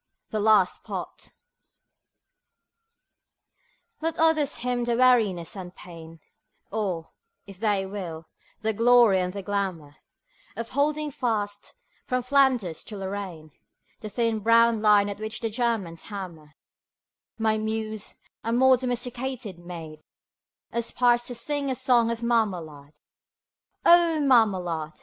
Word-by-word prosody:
THE 215 - -2
LAST 215 0 +3
POT - - -7 2.7
Let 325 0 -2
others 315 -3 +2
hymn 245 0 -2
the 235 -1 0
weariness 215 -10 +3
and 180 -2 -8
pain 165 -2 -12 0.5
(Or, 190 -6 -3 0.3
if 195 -2 -12
they 205 -3 +1
will, 180 -5 -6 0.4
the 220 0 0
glory 230 -3 +5
and 180 0 -1
the 200 +1 -6
glamour) 185 -7 -3 0.6
Of 230 0 -5
holding 300 +2 0
fast, 210 -6 -3 0.3
from 255 -1 0
Flanders 250 - +2
to 210 - -8
Lorraine, 190 -5 -6 0.5
The 215 - -7
thin 230 +1 0
brown 230 +1 +4
line 210 -1 +5
at 205 0 -5
which 220 +1 -4
the 225 -1 -3
Germans 220 -8 -2
hammer; 170 -7 -8 0.8
My 220 -1 +1
Muse, 220 -1 -4 0.3
a 230 - -2
more 260 +2 +5
domesticated 245 -4 -4
maid, 165 -3 -9 0.7
Aspires 240 +1 +1
to 245 - -5
sing 285 +3 -1
a 260 - 0
song 245 -3 +3
of 230 0 -3
Marmalade. 175 -11 -1 0.9
O 340 -2 +6
Marmalade! 185 - +2
220 Hz, 120 wpm, -26 LUFS, 185-245 Hz, 2.7 s, O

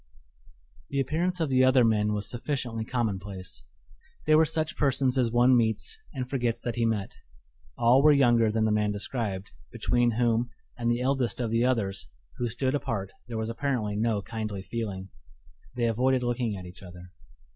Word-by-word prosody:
The 140 - -1
appearance 170 +7 0
of 160 -3 0
the 130 -1 +4
other 130 -1 +5
men 105 -1 +2
was 105 0 -2
sufficiently 120 -3 -3
commonplace; 100 - -4 0.6
they 155 - +4
were 160 +1 +6
such 160 0 -1
persons 135 -2 +2
as 125 -3 +2
one 120 +2 +5
meets 115 - 0
and 130 -1 -4
forgets 125 -3 -1
that 120 - -3
he 115 -1 +1
met. 105 -3 -1 0.7
All 120 +3 +5
were 150 +1 +6
younger 120 -6 +4
than 110 0 +1
the 110 - +2
man 105 -1 +1
described, 100 -2 -3 0.2
between 120 0 +1
whom 120 +1 +1 0.3
and 120 -1 -1
the 120 +1 +1
eldest 130 -2 0
of 115 -3 -1
the 115 +2 +2
others, 100 - 0 0.3
who 120 - -1
stood 130 +4 -1
apart, 105 -9 -2 0.2
there 115 -2 -5
was 110 +1 -2
apparently 115 -5 -1
no 110 -1 0
kindly 110 -3 -5
feeling. 100 -4 -5 0.7
They 120 -1 0
avoided 125 +3 +2
looking 120 -3 -1
at 90 - -9
each 90 0 -12
other. 90 -1 -12
120 Hz, 175 wpm, -27 LUFS, 105-130 Hz, 0.7 s, were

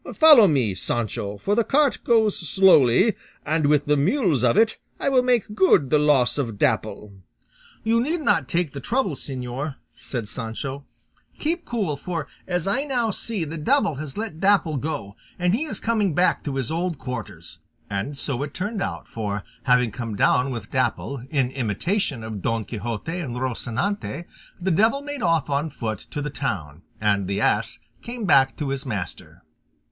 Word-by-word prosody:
Follow 300 -10 +8
me, 130 - +2
Sancho, 105 0 -2
for 200 - -1
the 230 +2 +3
cart 285 +4 +2
goes 220 -3 +3
slowly, 185 - +4 0.3
and 155 0 +1
with 150 -1 +3
the 150 - +3
mules 160 - +2
of 120 -2 +3
it 225 0 +3 0.2
I - - +1
will 260 -2 +4
make 245 -4 +1
good 185 -9 +4
the 150 - +5
loss 145 -3 +3
of 115 -7 -2
Dapple." 105 0 -1 0.7
"You 230 +1 +2
need 315 +6 -1
not 150 - +2
take 170 -3 0
the 140 - -5
trouble, 235 - 0
señor," 135 +1 -5 0.2
said 120 -5 -4
Sancho; 125 +5 -5 0.5
"keep 335 +2 -2
cool, 205 -11 -1
for 165 +1 -4 0.2
as 180 -2 -1
I 245 +8 +1
now 245 -6 0
see, 210 -2 -2
the 160 +1 -5
devil 235 - +2
has 150 +1 -7
let 210 -7 -4
Dapple 190 -6 +3
go 120 -8 -4 0.2
and 180 0 +1
he 270 +9 +1
is 305 - -4
coming 215 -8 0
back 180 +2 +2
to 140 -3 -3
his 135 -1 -1
old 170 0 -1
quarters;" 105 -10 -7 0.3
and 100 +9 -3
so 135 -2 -2
it 145 0 -5
turned 205 +2 -3
out, - - -4
for, 105 -2 -4 0.2
having 125 -3 +3
come 115 -2 -5
down 125 +6 +3
with 120 -3 -6
Dapple, 130 +1 -1
in 135 -4 0
imitation 130 - -1
of 110 -3 -6
Don 115 +1 -1
Quixote 120 - -4
and 135 -8 -4
Rocinante, 130 - -2 0.3
the 185 +1 0
devil 220 - +3
made 290 -2 -5
off 165 -5 +2
on 145 +3 0
foot 110 -7 -5
to 145 - -4
the 150 - -4
town, 85 - -4 0.2
and 100 -3 +1
the 100 +1 -1
ass - - +1 0.2
came 235 -2 -5
back 135 -6 +4
to 145 -3 -2
his 135 -1 -2
master. 105 -9 -6
150 Hz, 175 wpm, -23 LUFS, 125-200 Hz, 0.7 s, Follow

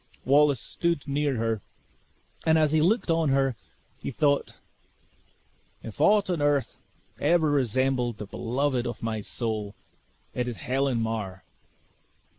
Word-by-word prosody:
Wallace 140 0 +4
stood 170 +1 -1
near 140 -1 0
her, 115 -2 -1 0.8
and 160 0 +4
as 155 -2 +3
he 155 0 +3
looked 185 +2 +2
on 165 -2 +2
her, 135 -2 +2 0.4
he - - -5
thought, 140 +1 0 1.3
"If 115 +5 -7
aught 205 +4 +4
on 170 -4 -1
earth 145 -2 +1 0.4
ever 160 0 +3
resembled 130 -3 +1
the 105 - -6
beloved 125 +4 -1
of 120 - -6
my 110 -1 -2
soul, 110 -2 -3 0.6
it 125 0 -2
is 120 -3 -4
Helen 130 -1 0
Mar!" 105 -5 -3
135 Hz, 130 wpm, -27 LUFS, 115-150 Hz, 1.3 s, Wallace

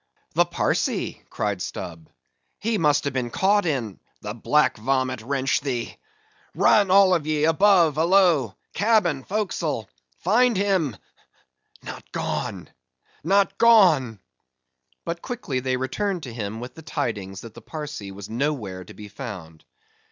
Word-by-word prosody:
"The - - +4
Parsee!" - - -1
cried 100 -3 -2
Stubb—"he 90 - -6
must 150 -3 +3
have 140 -2 -2
been 125 -2 -2
caught 200 - +2
in——" 120 - -2 0.2
"The 105 0 -5
black 150 +6 +2
vomit 130 +1 -1
wrench 135 +4 0
thee!—run 420 - -1
all 190 0 +6
of 160 -4 0
ye 155 -1 0
above, 165 -1 +4
alow, 165 - +3 0.2
cabin, 200 - +2
forecastle—find 185 - -1
him—not 185 - -5
gone—not 165 - -2
gone!" 170 - +5 0.9
But 170 0 -4
quickly 235 - -3
they 130 0 -1
returned 175 +8 -2
to 125 - -7
him 110 -1 -5
with 125 +1 -7
the 160 - -12
tidings 105 -11 -4
that 115 -2 -11
the - - -12
Parsee 150 -10 -7
was 100 0 -9
nowhere 115 -7 -3
to - - -14
be 105 - -10
found. 100 - -9
145 Hz, 120 wpm, -24 LUFS, -, 0.9 s, all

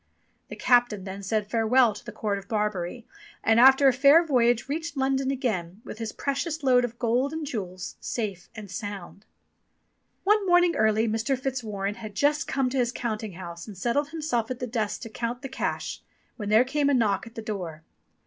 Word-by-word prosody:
The - - -8
captain 240 -5 +3
then 195 +1 -7
said 210 +2 -1
farewell 230 +1 +3
to - - -11
the - - -8
court 205 -3 -2
of 195 - -15
Barbary, 210 0 -2 0.4
and 225 +1 +4
after 265 +2 +7
a 265 - +6
fair 280 +6 +6
voyage 240 -5 +2
reached 320 +2 -4
London 265 0 +1
again 210 -9 -2
with 215 - -8
his 225 -2 -3
precious 290 +3 -3
load 250 -2 +4
of 240 -1 -4
gold 245 +4 +1
and 320 -1 -3
jewels 185 -8 -5
safe 200 -6 -4
and 210 -4 -9
sound. 200 -2 -7 1.0
One 415 +2 +3
morning 355 -1 +4
early 220 +1 +2
Mr. 225 +5 0
Fitzwarren 220 -6 -3
had 215 -2 -8
just 295 +5 +1
come 270 -2 0
to 270 - 0
his 240 -1 +1
counting 220 -4 -4
house 170 0 -8
and 205 -3 -9
settled 265 +9 0
himself 300 -8 -2
at 255 - -3
the 250 - -3
desk 220 -3 -2
to 230 - -7
count 235 +2 -4
the 270 - -5
cash, 265 - -3 0.3
when 210 -4 -5
there 220 +3 +6
came 285 +2 +1
a 280 - +3
knock 210 -3 +1
at 230 - -14
the 225 - -5
door. 175 -8 -5
235 Hz, 195 wpm, -26 LUFS, 210-265 Hz, 1.0 s, after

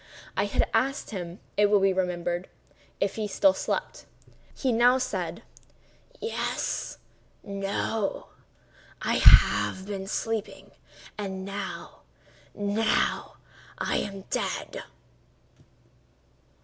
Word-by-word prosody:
I - - +2
had - - +1
asked 275 0 +1
him, 180 -3 -5 0.2
it 205 0 +6
will 205 -1 +5
be 195 0 +4
remembered, 180 -1 -1 0.5
if 200 +1 0
he 215 -1 -1
still 285 +8 +4
slept. - - -3 0.4
He 260 - 0
now 240 +2 +5
said: 260 - -3 0.8
"Yes;—no;—I 200 - -4
have 190 - +6
been 195 -1 -5
sleeping—and 205 -2 -5
now—now—I 205 +1 -3
am 195 -1 -3
dead." - - -2
200 Hz, 80 wpm, -27 LUFS, 190-225 Hz, 0.8 s, it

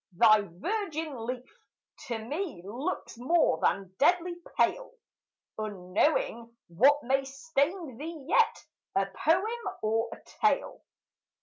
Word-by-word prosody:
thy 215 -1 +7
virgin 305 - -4
leaf 250 0 -5 0.5
To 235 -3 -2
me 250 - -4
looks 235 +2 -4
more 280 - +3
than 195 -2 0
deadly 350 +4 +3 0.2
pale, - - +1 0.7
Unknowing 215 - 0
what 275 - +4
may 270 +2 +2
stain 285 +1 -2
thee 310 -2 -7
yet, 455 +6 +3 0.3
A 195 - +3
poem 385 - 0
or 225 +2 +1
a - - -7 0.3
tale. - - +1
270 Hz, 110 wpm, -29 LUFS, 220-335 Hz, 0.7 s, thy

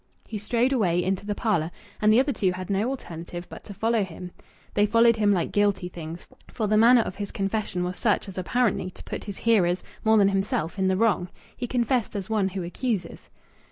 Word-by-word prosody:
He 215 - -5
strode 240 +5 +1
away 180 -8 +2
into 190 +2 -2
the 205 - -1
parlour, 185 -9 0 0.3
and 215 0 +5
the 220 - +6
other 275 +2 +2
two 190 -5 +1
had 185 +1 -5
no 200 +5 +1
alternative 175 -8 -6
but - - -10
to 205 - -8
follow 225 +1 +1
him. 180 0 -8 0.4
They 205 0 +3
followed 230 +2 +5
him 210 -1 +3
like 180 -4 0
guilty 205 -3 +1
things; 165 0 -8 0.3
for 220 - -2
the 210 +1 +2
manner 235 +3 +7
of 190 - -5
his 200 -1 -4
confession 195 -2 -2
was 180 0 -3
such 210 -3 +1
as 195 - -8
apparently 190 0 0
to - - -13
put - - -6
his 200 -2 -6
hearers, 185 -6 +2 0.2
more 220 0 +5
than 200 -1 +5
himself, 195 -3 -1
in 190 - +2
the 190 0 +2
wrong. 200 -5 +2 0.3
He 245 - -4
confessed 240 -2 0
as 200 +1 -4
one 210 -3 +2
who 190 -1 -4
accuses. 185 0 -3
200 Hz, 215 wpm, -25 LUFS, 180-225 Hz, 0.4 s, manner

